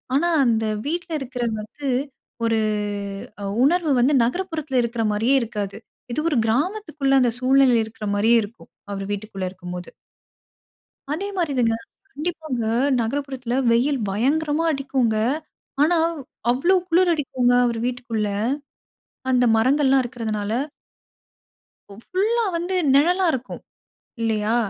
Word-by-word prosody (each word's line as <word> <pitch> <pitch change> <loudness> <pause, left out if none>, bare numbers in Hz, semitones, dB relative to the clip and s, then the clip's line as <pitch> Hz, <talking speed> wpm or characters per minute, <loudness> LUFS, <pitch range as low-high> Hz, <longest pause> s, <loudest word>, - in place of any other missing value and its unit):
ஆனா 340 +5 +3 0.2
அந்த 225 -2 +2 0.2
வீட்ல 340 +3 -3
இருக்கிறது 245 -4 -3
வந்து, 270 +7 -8 0.6
ஒரு 225 -1 +2 0.8
அ - - -5 0.2
உணர்வு 330 +2 +3
வந்து 260 +5 +4
நகரப்புறத்தில 310 -1 -1
இருக்கிற 235 -1 -2
மாரியே 225 +6 +2
இருக்காது. 210 -4 -4 0.4
இது 255 - -1
ஒரு 290 - 0
கிராமத்துக்குள்ள, 305 - 0
அந்த 240 -2 +3
சூழ்நிலையில 255 -2 +4
இருக்கிற 220 -1 -7
மாரியே 225 +3 +4
இருக்கும். 220 +3 -12 0.2
அவர் 195 0 -4
வீட்டுக்குள்ள 200 -2 -5
இருக்கும்போது. 180 -1 -8 1.2
அதே 390 +6 -3
மாரிதாங்க 255 -9 +1 0.4
கண்டிப்பாங்க. 310 -6 -3 0.4
நகரப்புறத்தில 255 0 -3 0.2
வெயில் 260 +3 +2
பயங்கரமா 295 +9 +1
அடிக்கும்ங்க. 265 -5 0 0.7
ஆனாவ், 330 +1 +2 0.4
அவ்வளோ 340 +10 +3
குளிர் 350 +1 +4
அடிக்குங்க 260 -5 +1
அவர் 235 -1 -1
வீட்டுக்குள்ள. 240 -4 -2 1.0
அந்த 250 -1 +4
மரங்கள்லாம் 265 +3 +3
இருக்கிறதனால. 220 -4 -3 1.4
ஒ - - -9
ஃபுல்‌லா 445 +5 0
வந்து 350 +3 -2 0.2
நிழலா 355 +7 +4
இருக்கும், 255 -1 -5 0.6
இல்லையா? 220 0 +1
255 Hz, 110 wpm, -23 LUFS, 225-310 Hz, 1.4 s, வந்து